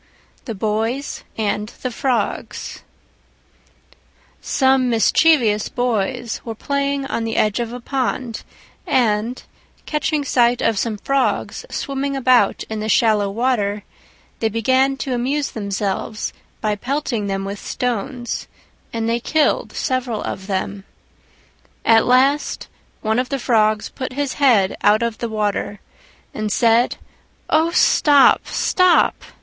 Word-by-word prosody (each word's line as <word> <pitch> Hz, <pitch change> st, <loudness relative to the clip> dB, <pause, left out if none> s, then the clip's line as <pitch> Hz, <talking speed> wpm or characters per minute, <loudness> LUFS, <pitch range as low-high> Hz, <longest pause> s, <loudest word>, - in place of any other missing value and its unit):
THE 225 Hz, -, -5 dB
BOYS 225 Hz, +7 st, -2 dB
AND 210 Hz, -1 st, -1 dB
THE 255 Hz, -, -2 dB
FROGS 255 Hz, +1 st, -2 dB, 1.6 s
Some 265 Hz, -2 st, +2 dB
mischievous 230 Hz, -2 st, +3 dB
Boys 245 Hz, 0 st, -2 dB
were 225 Hz, -2 st, -6 dB
playing 280 Hz, +2 st, -1 dB
on 270 Hz, -4 st, -2 dB
the 225 Hz, 0 st, -3 dB
edge 215 Hz, +1 st, +1 dB
of 235 Hz, -1 st, -3 dB
a 245 Hz, -, -6 dB
pond, 250 Hz, -2 st, -2 dB, 0.5 s
and, 230 Hz, 0 st, +1 dB, 0.4 s
catching 300 Hz, -1 st, -1 dB
sight 245 Hz, -2 st, +3 dB
of 225 Hz, -3 st, +1 dB
some 225 Hz, -3 st, -2 dB
Frogs 275 Hz, +6 st, -1 dB
swimming 275 Hz, 0 st, -3 dB
about 255 Hz, -6 st, +3 dB
in 220 Hz, -1 st, -5 dB
the 215 Hz, +1 st, -3 dB
shallow 215 Hz, -3 st, +3 dB
water, 210 Hz, -2 st, 0 dB, 0.6 s
they 225 Hz, -, +1 dB
began 260 Hz, +5 st, +2 dB
to 265 Hz, -1 st, -3 dB
amuse 275 Hz, +4 st, -1 dB
themselves 200 Hz, 0 st, -3 dB, 0.3 s
by 210 Hz, -1 st, 0 dB
pelting 245 Hz, -2 st, -2 dB
them 195 Hz, 0 st, -2 dB
with 200 Hz, +1 st, -5 dB
stones, 245 Hz, 0 st, -3 dB, 0.4 s
and 225 Hz, -1 st, -2 dB
they 230 Hz, +1 st, +1 dB
killed 310 Hz, +5 st, +1 dB
several 255 Hz, -5 st, -2 dB
of 190 Hz, -, -5 dB
them. 195 Hz, 0 st, -3 dB, 1.0 s
At 225 Hz, -1 st, +5 dB
last 270 Hz, +4 st, +2 dB, 0.3 s
one 220 Hz, +2 st, +1 dB
of 250 Hz, -, -2 dB
the 275 Hz, -, -1 dB
Frogs 215 Hz, -4 st, +1 dB
put 260 Hz, -2 st, -6 dB
his 285 Hz, 0 st, -2 dB
head 220 Hz, -9 st, +4 dB
out 210 Hz, +3 st, +4 dB
of 230 Hz, -1 st, -2 dB
the 235 Hz, -, -3 dB
water 205 Hz, -1 st, -2 dB, 0.5 s
and 215 Hz, -1 st, -3 dB
said, 230 Hz, +2 st, +3 dB, 0.6 s
"Oh, 320 Hz, +2 st, +4 dB
stop! 290 Hz, -4 st, +4 dB
stop! 365 Hz, -2 st, +3 dB
235 Hz, 125 wpm, -20 LUFS, 215-265 Hz, 1.6 s, At